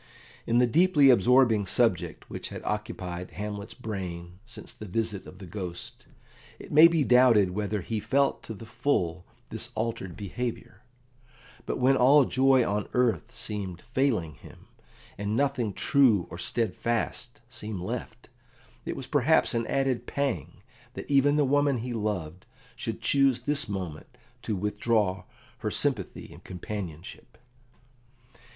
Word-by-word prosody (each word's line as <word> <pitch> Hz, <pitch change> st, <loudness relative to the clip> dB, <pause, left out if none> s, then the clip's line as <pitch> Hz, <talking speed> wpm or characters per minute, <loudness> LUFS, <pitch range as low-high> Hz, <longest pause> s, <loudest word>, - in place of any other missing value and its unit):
In 115 Hz, -, +2 dB
the 125 Hz, -, +5 dB
deeply 150 Hz, +1 st, +5 dB
absorbing 120 Hz, -4 st, +4 dB
subject -, -, 0 dB
which -, -, -6 dB
had -, -, -8 dB
occupied 100 Hz, -5 st, -4 dB
Hamlet's 105 Hz, +1 st, -6 dB
brain 90 Hz, -6 st, -6 dB
since -, -, -10 dB
the 110 Hz, -, -10 dB
visit 105 Hz, 0 st, -3 dB
of 90 Hz, -, -12 dB
the 95 Hz, -, -10 dB
Ghost, 85 Hz, -, -7 dB, 0.5 s
it -, -, -12 dB
may 155 Hz, +3 st, +9 dB
be 165 Hz, -3 st, +1 dB
doubted 125 Hz, -7 st, +5 dB
whether 105 Hz, +1 st, -2 dB
he 110 Hz, +4 st, -3 dB
felt 140 Hz, +6 st, +1 dB
to 110 Hz, -, -8 dB
the 115 Hz, -, -10 dB
full 100 Hz, -, -1 dB, 0.2 s
this 115 Hz, +1 st, -3 dB
altered 110 Hz, -5 st, -3 dB
behaviour; 110 Hz, 0 st, -5 dB, 0.9 s
but -, -, -2 dB
when 130 Hz, +2 st, +4 dB
all 135 Hz, +2 st, +6 dB
joy 130 Hz, -1 st, +3 dB
on 105 Hz, 0 st, -2 dB
earth 125 Hz, -2 st, +1 dB
seemed 95 Hz, -5 st, -5 dB
failing 120 Hz, -, 0 dB
him, -, -, -15 dB, 0.5 s
and 105 Hz, +1 st, -1 dB
nothing 125 Hz, -5 st, 0 dB
true 115 Hz, -, +3 dB
or 85 Hz, -, -7 dB
steadfast 115 Hz, +2 st, -2 dB
seemed 105 Hz, -4 st, -6 dB
left, 90 Hz, -, -6 dB, 0.6 s
it -, -, -3 dB
was -, -, -6 dB
perhaps -, -, +3 dB
an 115 Hz, -1 st, -1 dB
added 135 Hz, -3 st, 0 dB
pang 135 Hz, -, -3 dB, 0.3 s
that -, -, -7 dB
even 140 Hz, +1 st, +4 dB
the 150 Hz, -1 st, +3 dB
woman 145 Hz, 0 st, +2 dB
he 120 Hz, +2 st, -4 dB
loved 95 Hz, -6 st, -4 dB, 0.3 s
should -, -, -5 dB
choose 135 Hz, -3 st, +3 dB
this 145 Hz, -1 st, -1 dB
moment 90 Hz, -6 st, -6 dB, 0.2 s
to 110 Hz, -, -2 dB
withdraw 105 Hz, -1 st, 0 dB, 0.3 s
her -, -, -2 dB
sympathy -, -, -2 dB
and -, -, -15 dB
companionship. 95 Hz, +4 st, -8 dB
110 Hz, 140 wpm, -27 LUFS, 95-130 Hz, 0.9 s, may